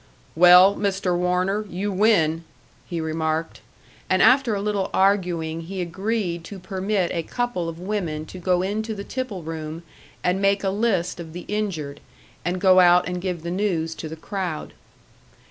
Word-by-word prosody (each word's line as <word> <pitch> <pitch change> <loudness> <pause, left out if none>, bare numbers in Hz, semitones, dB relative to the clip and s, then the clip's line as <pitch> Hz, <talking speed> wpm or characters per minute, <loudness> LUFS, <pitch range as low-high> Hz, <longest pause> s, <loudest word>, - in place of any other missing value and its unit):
"Well, 180 +3 +8
Mr. 195 -3 0
Warner, 180 +4 0
you 200 +4 -3
win," 180 -6 +2 0.4
he 170 - -3
remarked; 160 0 -2 0.5
and - - +3
after 255 -4 +5
a 200 - -2
little 205 -2 -1
arguing 175 -5 +1
he 185 +3 -6
agreed 180 0 -2
to 200 - -8
permit 190 0 -1
a 170 - -1
couple 235 -3 -2
of 165 - -7
women 175 -6 -3
to 185 - -10
go 180 0 +1
into 215 +3 -2
the 200 - -6
tipple 230 -7 -5
room 160 +1 -6 0.4
and 180 +2 +1
make 200 0 +2
a 195 - +1
list 195 -5 0
of 165 -2 -8
the 175 0 -7
injured, 175 -10 -3 0.4
and 180 +2 -1
go 185 0 +6
out 180 0 +5
and 180 0 -3
give 180 -3 -3
the 170 - -4
news 175 -4 -1
to 160 - -7
the 160 - -6
crowd. 180 -1 -5
180 Hz, 165 wpm, -23 LUFS, 165-200 Hz, 0.5 s, Well